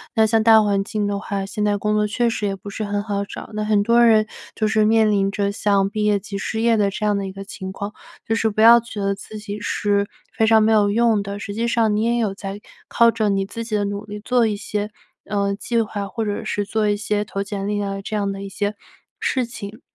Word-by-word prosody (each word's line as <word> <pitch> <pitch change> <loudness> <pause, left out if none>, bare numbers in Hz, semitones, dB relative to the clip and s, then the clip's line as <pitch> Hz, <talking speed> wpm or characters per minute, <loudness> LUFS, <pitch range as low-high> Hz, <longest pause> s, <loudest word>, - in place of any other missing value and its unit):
那 220 - +5
像 220 0 +2
大 220 -1 +7
环 200 -1 +1
境 210 0 -2
的 200 0 -1
话， 200 -1 -3
现 210 +1 -3
在 205 -1 +2
工 210 +1 -1
作 210 0 +2
确 235 +3 0
实 210 - -2
也 195 - -2
不 195 +1 -10
是 215 - -4
很 205 0 -2
好 200 -2 -2
找， 200 - -9
那 215 - -2
很 210 -1 +2
多 235 +2 +4
人 220 -2 +5 0.3
就 215 - +1
是 215 0 +2
面 220 0 +4
临 195 -1 +2
着 200 0 -1
像 200 -1 +2
毕 215 0 -2
业 210 -1 +3
即 200 +1 -8
失 220 +3 -3
业 230 0 +4
的 205 -2 +2
这 205 +2 -4
样 210 -1 +2
的 200 -1 -2
一 190 - -6
个 195 +1 -8
情 190 -1 -7
况， 200 +2 -6 0.3
就 225 - +1
是 225 0 +1
不 215 0 -5
要 235 +2 +9
觉 230 -2 -8
得 200 0 0
自 215 +2 -9
己 205 0 -6
是 205 -1 0 0.3
非 220 - +2
常 220 0 +6
没 220 - +3
有 210 -2 +4
用 225 0 +3
的， 200 0 -5
实 200 0 -6
际 230 +2 -1
上 225 -3 +2
你 215 - +1
也 235 +1 +1
有 215 -4 0
在 195 0 -6 0.3
靠 235 0 +4
着 220 -2 0
你 195 -1 +1
自 230 +4 -6
己 225 -2 -3
的 205 -1 +1
努 200 +1 -4
力 210 0 -7
做 240 +1 +2
一 210 - -1
些， 205 0 -3 0.4
呃， 200 -1 0
计 235 +3 -1
划， 205 -2 -4
或 225 +2 -3
者 205 +1 -3
是 205 -1 -2
做 215 0 0
一 205 - +1
些 210 0 -1
投 200 -1 -4
简 200 -1 -4
历 205 0 -1
啊， 195 0 -3
这 215 +2 -5
样 200 -1 0
的 195 - -6
一 195 - -6
些 205 +2 -2 0.5
事 255 -2 0
情。 220 0 -9
210 Hz, 285 characters per minute, -21 LUFS, 200-220 Hz, 0.5 s, 要